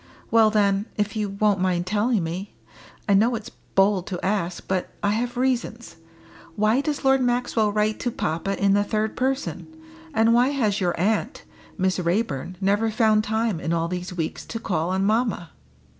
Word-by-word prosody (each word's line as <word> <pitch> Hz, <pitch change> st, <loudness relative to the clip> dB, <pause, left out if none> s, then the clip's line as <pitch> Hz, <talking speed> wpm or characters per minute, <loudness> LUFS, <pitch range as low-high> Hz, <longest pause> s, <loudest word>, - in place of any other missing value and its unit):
Well 225 Hz, -1 st, +6 dB
then, 205 Hz, 0 st, +1 dB
if 205 Hz, 0 st, -1 dB
you 210 Hz, -2 st, -1 dB
won't 200 Hz, 0 st, +1 dB
mind 180 Hz, -1 st, 0 dB
telling 210 Hz, +1 st, +1 dB
me 175 Hz, +5 st, -5 dB, 0.5 s
I 200 Hz, -, +4 dB
know 225 Hz, +5 st, +4 dB
it's 215 Hz, -2 st, -7 dB, 0.2 s
bold 195 Hz, -1 st, +3 dB
to 180 Hz, -3 st, -4 dB
ask, 190 Hz, -3 st, -2 dB
but 185 Hz, -1 st, -1 dB
I 205 Hz, -, +2 dB
have 240 Hz, +3 st, -2 dB
reasons 245 Hz, -5 st, -2 dB, 0.6 s
why 215 Hz, +5 st, +2 dB
does 290 Hz, -1 st, -3 dB
Lord 270 Hz, 0 st, +4 dB
Maxwell 245 Hz, -3 st, +1 dB
write 215 Hz, +1 st, 0 dB
to 245 Hz, -, -1 dB
papa 195 Hz, -1 st, -2 dB
in 200 Hz, 0 st, +3 dB
the 205 Hz, 0 st, +3 dB
third 215 Hz, +1 st, -1 dB
person, 265 Hz, +2 st, -2 dB, 0.4 s
and 225 Hz, -4 st, +3 dB
why 245 Hz, +2 st, +4 dB
has 225 Hz, -8 st, 0 dB
your 175 Hz, -2 st, 0 dB
aunt, 220 Hz, -, 0 dB, 0.3 s
Miss 190 Hz, -1 st, +1 dB
Raeburn, 180 Hz, -, -1 dB
never 205 Hz, +3 st, +1 dB
found 215 Hz, -1 st, +3 dB
time 220 Hz, -3 st, -1 dB
in 165 Hz, -, -2 dB
all 165 Hz, 0 st, 0 dB
these 180 Hz, +1 st, -4 dB
weeks 165 Hz, -3 st, -4 dB
to 230 Hz, -, -5 dB
call 170 Hz, -5 st, -1 dB
on 190 Hz, +1 st, 0 dB
mamma?" 215 Hz, -5 st, 0 dB
210 Hz, 175 wpm, -24 LUFS, 185-225 Hz, 0.6 s, Well